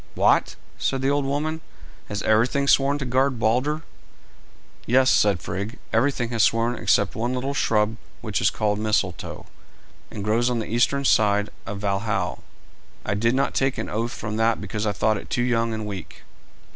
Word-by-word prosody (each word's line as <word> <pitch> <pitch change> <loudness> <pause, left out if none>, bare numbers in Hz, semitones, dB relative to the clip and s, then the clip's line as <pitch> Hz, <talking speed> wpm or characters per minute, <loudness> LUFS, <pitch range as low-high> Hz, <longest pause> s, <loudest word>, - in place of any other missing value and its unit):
"What!" - - +3 0.2
said 135 -1 -1
the 135 - +2
old 145 -1 +1
woman, 155 +3 -2 0.5
"has 105 0 -4
everything 120 +6 +2
sworn 140 +1 +4
to 140 - -4
guard 130 +1 +1
Balder?" 130 +8 0 1.0
"Yes," 130 +2 +4
said 100 -5 +3
Frigg, 100 +7 -4 0.2
"everything 120 0 +1
has 115 -2 0
sworn 115 +3 +3
except - - +1
one 120 +2 -2
little 135 +2 -2
shrub 110 -4 +1 0.2
which - - -2
is - - +4
called 105 -1 -1
Mistletoe, 105 -4 -2 0.6
and 100 - -6
grows 115 +4 +2
on 125 - 0
the 110 - -2
eastern 120 +5 +1
side 105 -3 +3 0.2
of 100 0 -5
Valhal. 100 -3 -1 0.6
I - - 0
did 115 +5 +1
not 135 - +1
take 135 0 0
an - - -4
oath 115 +3 -2
from 105 -1 -5
that 115 0 +2
because 105 +1 -3
I - - +2
thought 105 +2 +1
it - - -9
too 120 - 0
young 115 -2 +1
and 110 -1 -4
weak." 95 -6 -8
115 Hz, 175 wpm, -24 LUFS, 105-130 Hz, 1.0 s, sworn